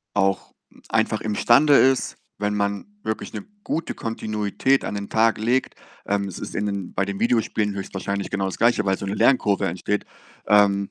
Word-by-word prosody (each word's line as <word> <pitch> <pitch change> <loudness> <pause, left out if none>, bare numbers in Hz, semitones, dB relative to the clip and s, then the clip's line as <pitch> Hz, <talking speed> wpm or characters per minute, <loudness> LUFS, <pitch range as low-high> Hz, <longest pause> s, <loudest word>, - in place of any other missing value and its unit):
auch 95 -1 0 0.3
einfach - - +1
imstande 120 +7 +4
ist, 135 0 +3 0.2
wenn 105 0 -1
man 100 0 -1 0.2
wirklich 110 - -4
'ne 105 - -6 0.2
gute 165 +1 -3
Kontinuität 110 +3 -1
an - - -3
den 100 0 -5
Tag 110 0 +2
legt 120 +4 0 0.3
ähm, 100 -1 0
es 90 - -7
ist - - -7
in 105 - -1
den 100 -3 -4
bei 100 - +1
den 100 -1 -5
Videospielen 110 -3 +1
höchstwahrscheinlich 100 0 -4
genau 100 -1 -1
das 95 - -5
Gleiche, 115 -2 +3
weil 95 -1 +1
so 100 - -5
'ne 100 - -2
Lernkurve 105 -7 +3
entsteht, 95 +4 -2 0.4
ähm, 100 -1 +4
105 Hz, 175 wpm, -23 LUFS, 100-115 Hz, 0.4 s, imstande